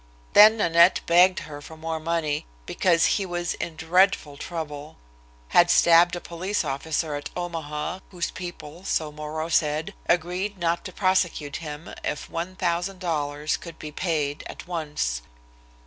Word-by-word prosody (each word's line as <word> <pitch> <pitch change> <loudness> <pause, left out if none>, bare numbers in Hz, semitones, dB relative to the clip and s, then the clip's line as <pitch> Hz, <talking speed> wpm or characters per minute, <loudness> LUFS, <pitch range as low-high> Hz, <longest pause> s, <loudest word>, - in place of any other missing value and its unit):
Then 215 +2 +9
Nanette 170 -2 +5
begged 180 +2 +5
her 145 -2 -9
for 160 +2 -11
more 160 0 -3
money, 155 -2 -1 0.2
because 170 - +2
he 200 - +1
was 175 0 -2
in 165 - -5
dreadful 160 -2 +2
trouble; 150 -2 -6 0.5
had 175 0 +5
stabbed 170 +1 +6
a - - -4
police 175 +2 -3
officer 150 +3 -2
at 145 0 -4
Omaha, 165 -1 -4
whose 175 -3 -3
people, 175 -2 -8
so 155 -5 -1
Moreau 155 +1 -4
said, 155 -1 +1 0.2
agreed 180 +4 0
not 170 -1 0
to 185 - -5
prosecute 180 -6 0
him 150 0 -8
if 150 - -4
one 175 +3 -4
thousand 180 +1 -1
dollars 150 -4 -1
could 170 -2 -10
be 150 - -8
paid 150 -3 -1
at - - -9
once. 150 - -2
165 Hz, 145 wpm, -25 LUFS, 150-175 Hz, 0.5 s, Then